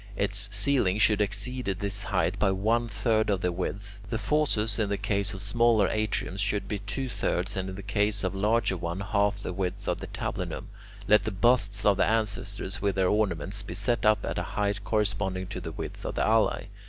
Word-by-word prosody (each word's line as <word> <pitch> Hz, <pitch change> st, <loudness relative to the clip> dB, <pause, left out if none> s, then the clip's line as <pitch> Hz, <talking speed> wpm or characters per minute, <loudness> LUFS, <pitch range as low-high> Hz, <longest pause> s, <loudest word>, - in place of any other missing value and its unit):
Its 100 Hz, 0 st, +2 dB
ceiling 105 Hz, -2 st, +3 dB
should 105 Hz, -1 st, +4 dB
exceed 105 Hz, +5 st, -2 dB
this 100 Hz, +1 st, -2 dB
height 95 Hz, 0 st, 0 dB
by 100 Hz, -, +3 dB
one 110 Hz, +5 st, +1 dB
third 110 Hz, +1 st, +1 dB
of 100 Hz, -2 st, +1 dB
the 90 Hz, -, +1 dB
width. 100 Hz, +3 st, -5 dB
The 115 Hz, -, -1 dB
fauces 115 Hz, -5 st, 0 dB
in 105 Hz, -2 st, +1 dB
the 100 Hz, -, 0 dB
case 100 Hz, 0 st, -1 dB
of 95 Hz, -, -3 dB
smaller 115 Hz, -1 st, +3 dB
atriums 105 Hz, -3 st, -1 dB
should 100 Hz, +1 st, -1 dB
be 105 Hz, -, -3 dB
two 105 Hz, +7 st, -3 dB
thirds, 95 Hz, -4 st, -2 dB
and 95 Hz, 0 st, -2 dB
in 95 Hz, -, -6 dB
the 100 Hz, -, -8 dB
case 105 Hz, 0 st, 0 dB
of 95 Hz, 0 st, -1 dB
larger 105 Hz, +1 st, +1 dB
one 85 Hz, +1 st, -4 dB
half 100 Hz, 0 st, +1 dB
the 95 Hz, -, -4 dB
width 90 Hz, -1 st, -3 dB
of -, -, 0 dB
the -, -, -7 dB
tablinum. -, -, -4 dB, 0.4 s
Let 105 Hz, -, +5 dB
the -, -, 0 dB
busts 105 Hz, -1 st, +2 dB
of 100 Hz, -2 st, +4 dB
ancestors 100 Hz, -3 st, 0 dB
with 100 Hz, -2 st, 0 dB
their 95 Hz, -1 st, +2 dB
ornaments 100 Hz, -2 st, 0 dB
be 95 Hz, -3 st, -7 dB
set 115 Hz, +5 st, 0 dB
up 105 Hz, -1 st, +3 dB
at -, -, -2 dB
a -, -, -5 dB
height 100 Hz, -1 st, 0 dB
corresponding 100 Hz, -3 st, -1 dB
to 95 Hz, -, -5 dB
the 80 Hz, -1 st, -6 dB
width -, -, -7 dB
of -, -, -4 dB
the -, -, +1 dB
alae. -, -, +2 dB
100 Hz, 205 wpm, -28 LUFS, 95-105 Hz, 0.4 s, Let